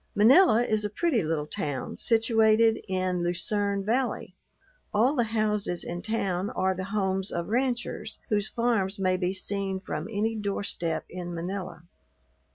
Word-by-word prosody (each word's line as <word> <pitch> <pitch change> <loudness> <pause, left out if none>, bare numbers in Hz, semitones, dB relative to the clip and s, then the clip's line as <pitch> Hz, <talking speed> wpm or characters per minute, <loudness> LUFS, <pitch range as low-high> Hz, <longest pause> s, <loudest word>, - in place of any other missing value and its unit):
Manila 240 - +6
is 215 -3 0
a 210 - -1
pretty 275 - +1
little 155 -2 -1
town, 145 -2 -4
situated 225 -1 +4
in 185 -2 -1
Lucerne 200 +3 -1
Valley. 245 +4 -1 0.6
All 235 +7 +3
the 240 -5 +1
houses 210 -5 0
in 175 +1 -5
town 200 -3 -1
are 190 0 0
the 185 0 -5
homes 195 -1 -1
of 170 +1 -3
ranchers, 240 -2 -1
whose 210 -1 +1
farms 225 -5 0
may 185 -1 +1
be 180 0 0
seen 195 0 -2
from 180 -3 -5
any 220 +2 0
doorstep 200 -5 -1
in 175 -1 -6
Manila. 180 -1 -5
200 Hz, 145 wpm, -27 LUFS, 185-225 Hz, 0.6 s, Manila